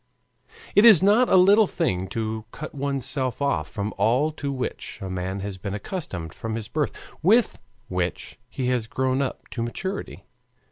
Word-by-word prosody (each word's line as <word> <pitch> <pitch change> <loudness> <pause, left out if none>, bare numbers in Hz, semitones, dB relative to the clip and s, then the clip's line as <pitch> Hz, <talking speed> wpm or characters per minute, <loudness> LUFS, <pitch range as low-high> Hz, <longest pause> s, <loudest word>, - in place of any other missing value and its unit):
"It 205 - +6
is 215 -7 +9
not 215 +6 +5
a - - +5
little 200 +3 +6
thing 95 - -1
to 110 +2 -3
cut 155 - -8
one's 140 -2 -2
self 130 -4 0
off 90 - 0
from 105 +1 -4
all 130 +8 +3
to 145 -2 -4
which 130 -2 -4
a 95 -1 -5
man 95 +1 -3
has 100 -1 -6
been 100 +1 -4
accustomed 100 - -5
from 115 -1 -5
his 110 -2 -4
birth, 150 +2 -2 0.2
with 220 +8 +3 0.3
which 90 +4 -3
he 130 -2 -2
has 120 -3 0
grown 130 +2 0
up 135 - -4
to 120 - -5
maturity. 190 +12 -5
130 Hz, 175 wpm, -24 LUFS, 100-155 Hz, 0.3 s, is